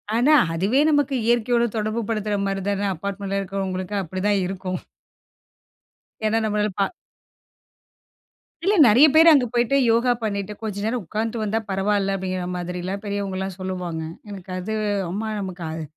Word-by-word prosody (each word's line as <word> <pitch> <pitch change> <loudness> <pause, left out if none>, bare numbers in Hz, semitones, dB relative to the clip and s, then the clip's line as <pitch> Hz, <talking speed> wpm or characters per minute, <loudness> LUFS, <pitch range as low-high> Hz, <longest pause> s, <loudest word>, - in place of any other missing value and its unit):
ஆனா, 255 +7 +4 0.2
அதுவே 205 - +2
நமக்கு 290 -2 +2
இயற்கையோட 235 0 +2
தொடர்பு 215 +1 -1
படுத்துற 210 -2 -1
மாரி 195 0 -2
தானே, 200 0 -1
அபார்ட்மெண்ட்டில 195 +2 -3
இருக்கிறவங்களுக்கு 190 0 -3
அப்படிதான் 190 +3 0
இருக்கும். 185 -1 -4 1.5
ஏன்னா 215 +1 +2
நம்மளால 210 -1 0
பா 195 - +3 1.8
இல்ல, 405 +2 +3
நெறையா 240 +8 +7
பேரு 325 +1 +8
அங்க 275 -5 +5
போயிட்டு 240 +3 +2
யோகா 235 +2 +3
பண்ணிட்டு, 200 -2 -2
கொஞ்ச 210 -3 -4
நேரம் 235 +2 -1
உக்காந்துட்டு 220 +4 -3
வந்தா 215 +1 0
பரவாயில்ல 195 0 +1
அப்படிங்கிற 185 -1 -3
மாதிரிலாம், 180 +2 -4
பெரியவங்கலாம் 195 -2 -3
சொல்லுவாங்க. 180 -3 -4 0.3
எனக்கு 195 -2 -9
அது 190 +4 -4 0.4
ஆமா 210 +4 -3
நமக்கு 185 -3 -6
அது 160 0 -5
200 Hz, 135 wpm, -23 LUFS, 190-225 Hz, 1.8 s, பேரு